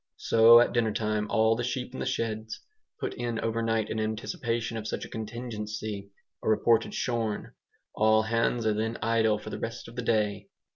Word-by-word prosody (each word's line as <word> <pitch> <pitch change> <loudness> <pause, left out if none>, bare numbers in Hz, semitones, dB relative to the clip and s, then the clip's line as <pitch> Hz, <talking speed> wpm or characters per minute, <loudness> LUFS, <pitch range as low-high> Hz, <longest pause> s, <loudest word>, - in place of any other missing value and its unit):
So 115 +1 +7
at 120 - +3
dinner 115 -2 +2
time 105 0 -1
all 110 0 +3
the 120 - -2
sheep 125 +1 -3
in - - -6
the - - -2
sheds, 110 -1 -3 0.4
put - - -3
in 120 -2 -3
overnight 115 -1 0
in 110 - -2
anticipation 115 +1 -2
of 110 -1 -4
such - - -3
a - - -11
contingency, 110 -3 -5 0.3
are - - -1
reported 115 +1 +3
shorn. 115 -4 -2 0.4
All 110 0 +4
hands 115 +1 0
are 110 - +3
then 110 +2 -2
idle 110 -1 +2
for - - -8
the - - -5
rest 115 +1 -5
of 115 - -12
the 125 - -2
day. 105 -3 0
110 Hz, 185 wpm, -28 LUFS, 110-115 Hz, 0.4 s, So